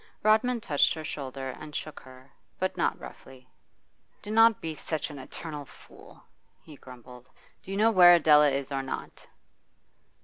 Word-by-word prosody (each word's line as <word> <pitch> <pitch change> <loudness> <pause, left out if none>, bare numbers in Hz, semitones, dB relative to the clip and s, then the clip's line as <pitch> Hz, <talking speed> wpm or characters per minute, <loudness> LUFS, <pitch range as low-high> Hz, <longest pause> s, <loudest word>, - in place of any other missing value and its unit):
Rodman 220 +3 +2
touched 155 -3 +1
her 160 - -7
shoulder 135 -3 -6
and 150 -1 -11
shook 155 -2 -6
her, 130 +1 -17 0.3
but - - -2
not - - -1
roughly. 130 -1 -13 0.8
'Do 210 - -7
not 225 0 +5
be 160 -1 -5
such 155 0 -5
an 145 - -10
eternal 150 +2 -8
fool!' - - -17 0.4
he 155 - -14
grumbled. 125 -1 -15 0.3
'Do - - -16
you 195 - -4
know 220 +2 +3
where 175 -4 +8
Adela 150 -2 +5
is 140 0 -4
or 135 -1 -2
not? 135 - -8
150 Hz, 160 wpm, -27 LUFS, 135-180 Hz, 0.8 s, where